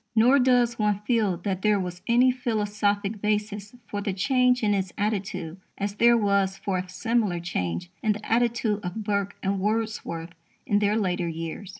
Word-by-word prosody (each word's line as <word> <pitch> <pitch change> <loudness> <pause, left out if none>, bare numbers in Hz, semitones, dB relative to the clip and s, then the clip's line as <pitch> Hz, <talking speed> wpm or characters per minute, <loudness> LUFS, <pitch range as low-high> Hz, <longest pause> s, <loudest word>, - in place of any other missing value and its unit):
Nor 245 +5 +5
does 245 -2 +3
one 210 -1 +2
feel 210 -5 +1
that 185 +1 -3
there 210 -1 +3
was 180 -1 -5
any 245 +2 +5
philosophic 210 -4 -1
basis 210 0 -2
for 205 - -4
the 200 -1 -2
change 250 +5 +2
in 205 -1 +3
his 190 -2 -1
attitude 195 -5 -2 0.2
as 200 0 -2
there 235 +3 +5
was 200 -2 +1
for 190 -2 -2
a 185 0 -6
similar 215 -2 0
change 90 - -3
in 215 - +2
the 210 +1 -9
attitude 230 -2 +1
of 185 +5 -4
Burke 200 -1 -1
and 195 0 0
Wordsworth 210 -5 -2 0.3
in 205 - +2
their 210 +1 +2
later 180 -4 0
years. 165 +3 -5
205 Hz, 175 wpm, -26 LUFS, 190-225 Hz, 0.3 s, Nor